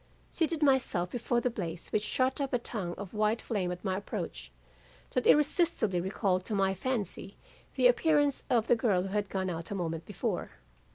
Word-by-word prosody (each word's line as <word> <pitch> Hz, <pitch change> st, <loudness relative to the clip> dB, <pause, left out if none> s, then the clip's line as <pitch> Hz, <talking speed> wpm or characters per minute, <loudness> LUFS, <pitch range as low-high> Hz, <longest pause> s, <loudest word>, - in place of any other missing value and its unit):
seated 325 Hz, -2 st, 0 dB
myself 250 Hz, -11 st, +2 dB
before 240 Hz, 0 st, 0 dB
the 250 Hz, -, 0 dB
blaze 175 Hz, -6 st, -5 dB
which 210 Hz, -, +1 dB
shot 260 Hz, +5 st, +1 dB
up 275 Hz, -1 st, -2 dB
a -, -, +4 dB
tongue 200 Hz, -7 st, -4 dB
of 195 Hz, -2 st, -7 dB
white 215 Hz, +1 st, +1 dB
flame 190 Hz, -5 st, -2 dB
at 180 Hz, +3 st, -7 dB
my 190 Hz, -1 st, 0 dB
approach, 200 Hz, -, -5 dB, 0.6 s
that 250 Hz, -, 0 dB
irresistibly 295 Hz, -, +3 dB
recalled 190 Hz, 0 st, 0 dB
to 210 Hz, -, -3 dB
my 195 Hz, -1 st, +2 dB
fancy 205 Hz, -2 st, -3 dB, 0.4 s
the -, -, +2 dB
appearance 300 Hz, -, +4 dB
of 235 Hz, -3 st, +3 dB
the 240 Hz, -, +4 dB
girl 210 Hz, -6 st, +2 dB
who 195 Hz, -, -4 dB
had 205 Hz, 0 st, -1 dB
gone 190 Hz, 0 st, -2 dB
out 165 Hz, -2 st, -4 dB
a 205 Hz, -, -3 dB
moment 165 Hz, -3 st, -3 dB
before. -, -, -3 dB
210 Hz, 185 wpm, -30 LUFS, 185-255 Hz, 0.6 s, a